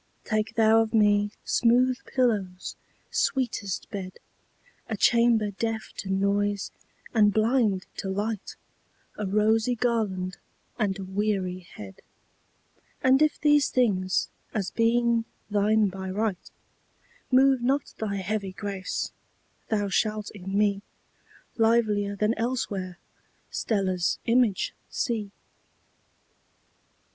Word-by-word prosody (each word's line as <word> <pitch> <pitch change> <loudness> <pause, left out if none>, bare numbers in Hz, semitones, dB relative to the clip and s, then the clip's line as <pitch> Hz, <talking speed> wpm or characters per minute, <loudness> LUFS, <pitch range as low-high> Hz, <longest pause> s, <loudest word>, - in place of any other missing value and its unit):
Take 215 0 -1
thou 225 0 +5
of 225 0 -1
me 205 -1 +4 0.2
smooth 250 +2 +3
pillows, 205 -8 -1 0.4
sweetest 240 -7 -1
bed,A 205 - -10
chamber 230 -2 +3
deaf 220 +2 -3
to 190 - -5
noise 200 +1 0 0.4
and 210 -3 +5
blind 215 -3 +2
to 195 - -4
light,A 210 0 -6
rosy 220 +4 +2
garland 210 -6 -1 0.4
and 200 -4 0
a 195 - -6
weary 190 -1 -1 0.2
head:And 260 - -4
if 305 -1 +2
these 295 -2 +4
things, 190 -7 +1 0.3
as 200 -3 -1
being 230 0 +2 0.3
thine 210 +1 +3
by 190 0 -5
right, 200 -1 -2 0.8
Move 265 0 +5
not 270 +4 0
thy 210 -2 -2
heavy 195 0 -3
grace, 195 -1 -4 0.6
thou 205 -2 +1
shalt 210 +2 -1
in 195 -1 -4
me, 200 -1 +2 0.8
Livelier 220 -3 +2
than 210 +2 +1
elsewhere, 205 -7 -2 0.5
Stella's 185 -5 0
image 230 -4 +2 0.2
see. 225 -5 -2
210 Hz, 100 wpm, -26 LUFS, 195-230 Hz, 0.8 s, thou